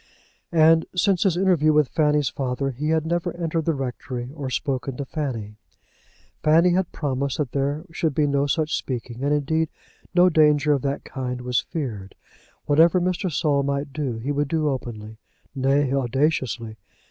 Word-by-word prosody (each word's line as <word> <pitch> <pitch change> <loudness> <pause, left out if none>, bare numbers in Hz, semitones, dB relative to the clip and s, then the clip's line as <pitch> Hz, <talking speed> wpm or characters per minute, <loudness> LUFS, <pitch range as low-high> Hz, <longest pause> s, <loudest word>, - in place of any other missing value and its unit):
And 160 0 +5
since 185 0 +2
his 185 -4 +2
interview 175 -5 +3
with 150 -3 +3
Fanny's 150 -3 +2
father 135 +1 -2
he 145 +5 -3
had 160 -1 +1
never 170 +1 -2
entered 165 -2 -2
the 165 - +1
rectory, 125 -1 -5
or 145 -4 -5
spoken 130 0 -2
to 140 - -4
Fanny. 115 -8 -4 0.8
Fanny 165 +4 +4
had 180 0 0
promised 140 -2 -2
that 145 -5 -2
there 145 +4 -1
should 160 -3 -1
be 150 - +3
no 140 0 +1
such 155 +3 0
speaking, 125 -1 -5
and 145 - +1
indeed 155 +2 +1 0.5
no 180 0 +6
danger 150 -3 +4
of 140 - 0
that 140 +1 -2
kind 125 -2 -5
was 125 0 +1
feared. 110 - -5 0.5
Whatever 165 +5 +5
Mr. 180 +1 -1
Saul 145 -2 +1
might 140 0 -2
do 135 -6 -2
he 125 +6 -3
would 145 0 0
do 155 0 0
openly, 110 -5 -6 0.3
nay, 135 0 +1
audaciously. 130 -4 -1
145 Hz, 165 wpm, -23 LUFS, 130-160 Hz, 0.8 s, no